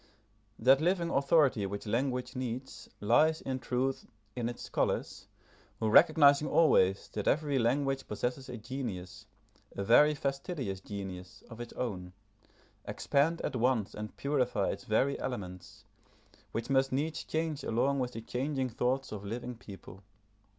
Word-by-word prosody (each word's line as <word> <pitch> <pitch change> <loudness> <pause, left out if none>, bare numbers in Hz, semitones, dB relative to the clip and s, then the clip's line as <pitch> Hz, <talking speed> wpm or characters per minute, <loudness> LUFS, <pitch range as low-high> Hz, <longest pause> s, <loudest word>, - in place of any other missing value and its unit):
That 130 +5 +5
living 170 0 +1
authority 140 -5 +3
which 100 +2 -6
language 125 +3 -1
needs 130 +1 -5
lies, 155 +10 +4
in 130 -1 -3
truth, 130 +2 -2 0.3
in 120 -1 -1
its 120 - -7
scholars, - - -2 0.5
who 110 - 0
recognising 145 0 +6
always 100 - +3
that 105 - -3
every 145 -2 +2
language 135 +3 0
possesses 125 +5 -3
a 125 - -5
genius, 110 -7 -6 0.5
a 100 - -2
very 150 +8 +6
fastidious 135 - -3
genius, 95 -3 -8
of 115 +1 -8
its 120 - -8
own, 90 -7 -4 0.7
expand 155 +4 0
at - - -3
once 120 -3 +1
and 105 0 -7
purify 125 -8 0
its - - -7
very 135 +6 +1
elements, 90 -8 -6 0.7
which 115 - -3
must 135 -1 +2
needs 150 +4 -1
change 160 -2 -2
along 135 +5 +1
with 125 -1 -2
the 115 - -6
changing 130 +3 -2
thoughts 125 +3 -1
of 105 -2 -6
living 120 +4 -5
people. 95 -4 -12
125 Hz, 140 wpm, -31 LUFS, 110-140 Hz, 0.7 s, recognising